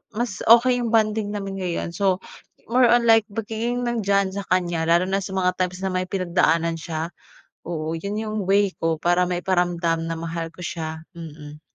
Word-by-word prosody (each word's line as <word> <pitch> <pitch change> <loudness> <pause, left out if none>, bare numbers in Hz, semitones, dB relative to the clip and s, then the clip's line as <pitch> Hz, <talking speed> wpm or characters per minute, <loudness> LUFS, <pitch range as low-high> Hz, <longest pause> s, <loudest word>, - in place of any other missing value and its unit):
mas 235 -4 -2
okay 245 +2 +6
yung 235 -2 -1
bonding 215 -1 +2
namin 195 -1 -4
ngayon. 175 -2 -3
So, 190 0 +1 0.5
more 250 +2 +4
on 240 -1 +4
like 225 -1 +7
pagiging 225 +3 -2
nandiyan 200 -4 +1
sa 200 - -3
kanya 175 -3 +1
lalo 170 +2 +4
na 195 +1 0
sa 190 - -6
mga 180 -1 +2
times 180 0 -1
na - - +1
may 185 0 0
pinagdaanan 170 -3 +1
siya. 160 0 -4 0.6
Oo, 160 -1 -3
yun 200 +4 -4
yung 215 -1 -4
way 200 0 +3
ko 165 -1 0
para 175 +2 +2
maiparamdam 175 -2 0
na 165 - -3
mahal 165 0 -4
ko - - -27
siya, 160 -1 -4 0.2
mm. 150 -2 -10
185 Hz, 180 wpm, -23 LUFS, 165-210 Hz, 0.6 s, like